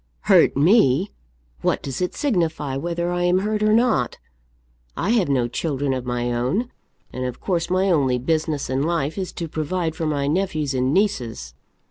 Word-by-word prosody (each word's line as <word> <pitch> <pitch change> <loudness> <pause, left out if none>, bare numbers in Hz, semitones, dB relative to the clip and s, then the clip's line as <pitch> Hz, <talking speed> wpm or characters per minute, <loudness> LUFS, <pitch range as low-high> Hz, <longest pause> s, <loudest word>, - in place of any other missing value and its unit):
"Hurt 185 -9 +4
me! 170 - +4 0.5
What - - 0
does 135 +2 -4
it 180 - -1
signify 165 - -1
whether 170 +4 -2
I 175 0 -1
am 180 +1 +3
hurt 210 +2 -1
or 215 0 +3
not? 220 - +2 0.8
I 200 - 0
have 215 -10 +2
no 125 -4 +2
children 140 +1 -2
of 130 -1 -4
my 120 0 -1
own, 135 - -1 0.4
and 130 - -4
of 125 -1 -5
course 170 -3 -1
my 185 +2 +2
only 135 -6 +2
business 155 +2 -1
in 130 +1 -1
life 160 -1 -1
is 190 -2 -4
to 170 - -4
provide 160 +1 -2
for 160 -1 -2
my 145 -2 0
nephews 155 -3 -1
and 130 0 +1
nieces. 145 - -1
160 Hz, 175 wpm, -22 LUFS, 135-185 Hz, 0.8 s, Hurt